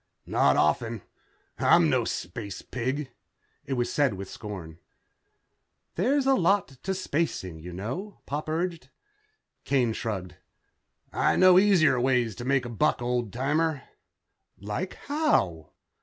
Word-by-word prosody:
"Not - - +3
often. 110 +8 +1 0.6
I'm - - +5
no - - +2
space 100 +2 -5
pig." 130 +2 -3 0.5
It 140 - -3
was 120 -2 -1
said 140 -8 +2
with 95 0 -7
scorn. 90 -6 -8 1.1
"There's 265 - +1
a 270 - +5
lot 195 -2 +2
to 145 +8 -5
spacing, 150 - -2
you 90 +3 -8
know," 125 - -5
Pop 150 +2 -4
urged. 170 +1 -2 0.7
Kane 125 -5 +1
shrugged. 95 -7 -4 0.8
"I - - +2
know 185 0 +7
easier 175 -10 +4
ways 125 -3 +2
to 120 - -6
make 135 -1 +1
a - - -5
buck, 150 +7 +1
old 120 -3 -1
timer." 150 +5 0 0.7
"Like 105 - -4
how?" 275 - +1
130 Hz, 125 wpm, -27 LUFS, 105-165 Hz, 1.1 s, know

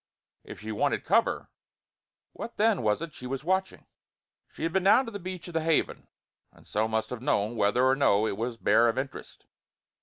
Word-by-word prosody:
If - - -10
she - - -5
wanted - - 0
cover, - - +1 0.8
what 235 - -8
then 215 -2 +3
was 110 +6 0
it 165 -3 -7
she 125 - -8
was 135 +2 -4
watching? 190 +3 -1 0.7
She - - -8
had 165 0 -1
been 190 - +2
down 250 +7 +6
to 230 - -7
the 205 - -6
beach 185 -1 -7
of 175 - -9
the 160 - 0
Haven, 160 -1 0 0.4
and - - -21
so 110 +2 0
must 110 0 -2
have 125 -2 -5
known 115 -4 0
whether 110 +4 +2
or 130 0 +4
no 110 -6 +3
it 105 - -1
was 115 +2 -3
bare 115 +1 +4
of 115 - -2
interest. 135 +1 -6
135 Hz, 205 wpm, -28 LUFS, 115-180 Hz, 0.8 s, down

